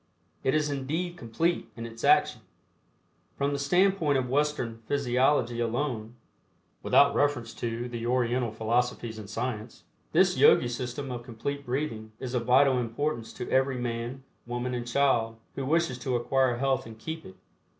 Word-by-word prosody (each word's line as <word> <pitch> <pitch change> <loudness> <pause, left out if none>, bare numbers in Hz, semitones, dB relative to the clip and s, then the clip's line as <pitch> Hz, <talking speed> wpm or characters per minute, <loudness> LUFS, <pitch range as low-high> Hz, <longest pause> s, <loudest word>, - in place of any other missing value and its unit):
It 130 - +2
is 150 -1 +1
indeed 155 +6 -2
"complete" 165 +5 -1
in 115 - -6
its 115 0 -9
action. - - +4 1.0
From 140 +1 0
the 140 - -2
standpoint 170 0 +3
of 130 -1 -1
Western 130 -4 -1
physiology 125 -2 +2
alone, 120 -1 -2 0.7
without 140 0 +5
reference 140 -6 0
to 120 +1 -3
the 120 -1 -4
Oriental 120 -1 +1
philosophies 115 0 -1
and 105 -2 -9
science, 110 -1 -4 0.3
this - - +4
Yogi 120 - +6
system 125 +3 -4
of 120 -1 -4
Complete 130 +4 -5
Breathing 120 -5 -3
is 130 -1 -5
of 120 -2 -1
vital 130 +1 +5
importance 120 +1 -2
to 125 - -6
every 130 0 +2
man, 120 +2 -4 0.2
woman 120 +1 -3
and 120 -1 -3
child 120 -4 +2 0.2
who 135 -1 -4
wishes 160 -5 +1
to 125 0 -1
acquire 125 +1 +2
health 135 -2 0
and 110 -1 -10
keep 160 +7 -6
it. 95 - -12
125 Hz, 155 wpm, -28 LUFS, 115-140 Hz, 1.0 s, Yogi